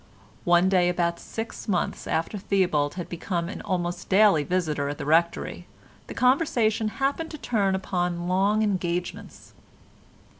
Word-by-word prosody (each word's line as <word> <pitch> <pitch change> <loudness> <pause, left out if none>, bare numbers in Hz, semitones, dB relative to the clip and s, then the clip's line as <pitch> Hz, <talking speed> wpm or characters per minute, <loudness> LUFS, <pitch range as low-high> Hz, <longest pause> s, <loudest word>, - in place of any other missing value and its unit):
One 175 +1 +4
day 180 -2 +3
about 170 -1 0
six 225 +1 -7
months 185 -4 -1
after 165 +6 -1
Theobald 175 -7 +1
had 175 -2 -5
become 170 0 -3
an - - -6
almost 175 -3 -3
daily 195 -6 +5
visitor 155 -4 -1
at 145 - -4
the - - -5
Rectory 165 +3 +1 0.4
the - - -8
conversation 245 -5 +2
happened 280 +4 -1
to 305 - -7
turn 200 -8 0
upon 175 -2 -2
long 200 +4 +2
engagements. 180 -3 -3
185 Hz, 140 wpm, -25 LUFS, 175-210 Hz, 0.4 s, daily